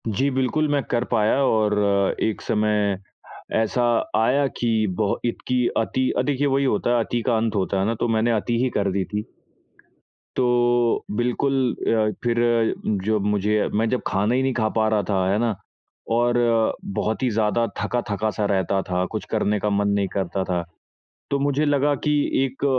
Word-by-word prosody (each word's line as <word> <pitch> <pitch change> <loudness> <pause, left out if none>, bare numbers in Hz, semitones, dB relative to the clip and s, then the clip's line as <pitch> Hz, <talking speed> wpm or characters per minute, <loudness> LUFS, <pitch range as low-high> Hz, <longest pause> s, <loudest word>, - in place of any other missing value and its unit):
जी 130 +6 +1
बिल्कुल 130 +4 0
मैं 145 -1 +2
कर 120 - +1
पाया 110 -2 +3
और 110 -3 +2 0.5
एक 110 - -1
समय 105 -2 +1 0.6
ऐसा 115 +2 +1 0.3
आया 130 +6 +3
कि 115 -2 +1
बहो 105 -2 0
इतकी 125 +1 0
अति 130 +3 0
अ, - - +3
देखिए 145 0 0
वही 135 0 +1
होता 120 0 +1
है 115 - +2
अति 120 - -2
का 120 -3 +3
अंत 110 -1 -1
होता 95 0 0
है 95 - +1
ना, 115 +2 0
तो 120 - -1
मैंने 115 +1 +1
अति 115 +1 0
ही 130 - +1
कर 100 -1 +1
दी 95 0 0
थी। 105 0 -4 1.1
तो 120 -1 +2
बिल्कुल 125 +4 0 0.3
अ, 110 -1 +2
फिर 120 -1 +1 0.7
जब 110 -1 +1
मुझे 105 +1 +1
मैं 110 +2 +1
जब 125 - -1
खाना 105 +5 +1
ही 130 - +1
नहीं 135 0 0
खा 110 -3 0
पा 110 0 +3
रहा 105 -2 +1
था, 95 -2 +1
है 100 - +2
ना? 115 -2 0 0.6
और 120 +1 +2 0.6
बहुत 110 +4 -1
ही 125 - +2
ज़्यादा 110 +2 +1
थका-थका 105 0 -1
सा 105 - 0
रहता 95 0 +1
था, 90 0 -1
कुछ - - -4
करने 105 0 +1
का 105 - -1
मन 100 0 +1
नहीं 100 -1 0
करता 95 -1 -2
था, 90 -2 -1 0.7
तो 140 - +1
मुझे 145 +1 +1
लगा 145 0 +2
कि 150 - +3 0.3
एक 135 +1 -4
115 Hz, 180 wpm, -23 LUFS, 105-125 Hz, 1.1 s, पाया